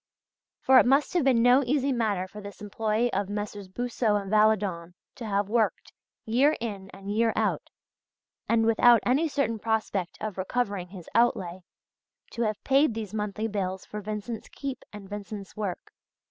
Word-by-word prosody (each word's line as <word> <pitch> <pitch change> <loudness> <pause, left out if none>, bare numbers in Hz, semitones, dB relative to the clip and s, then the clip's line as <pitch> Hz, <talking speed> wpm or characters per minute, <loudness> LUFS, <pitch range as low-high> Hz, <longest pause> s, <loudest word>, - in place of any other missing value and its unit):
For 260 0 +7
it - - +4
must 275 +3 +3
have 350 -4 +2
been 250 -4 +4
no 250 +3 +6
easy 275 +2 +1
matter 210 -7 0
for 210 +2 -10
this 200 -1 -10
employee 215 +3 -1
of 200 0 -1
Messrs. 205 -1 -5
Boussod 225 0 0
and 195 -1 -7
Valadon 205 -5 +2 0.2
to 230 - -7
have 200 -1 0
worked 220 0 0 0.3
year 265 +7 +3
in 200 -4 -5
and 195 +1 -8
year 225 0 +3
out - - -1 0.8
and, 230 -1 +3
without 230 0 +5
any 280 +7 +3
certain 275 -7 -1
prospect 215 -5 -1
of 210 -3 -5
recovering 200 -2 -2
his 180 -2 -11
outlay, 190 -6 +1 0.7
to 235 - -5
have 215 -2 -1
paid 275 -3 +3
these 215 -3 -5
monthly 210 +1 -2
bills 190 -3 -3
for 210 - -6
Vincent's 215 +2 -5
keep 275 -2 -6
and 205 -2 -10
Vincent's 205 0 -7
work. 205 -4 -5
215 Hz, 165 wpm, -27 LUFS, 200-240 Hz, 0.8 s, For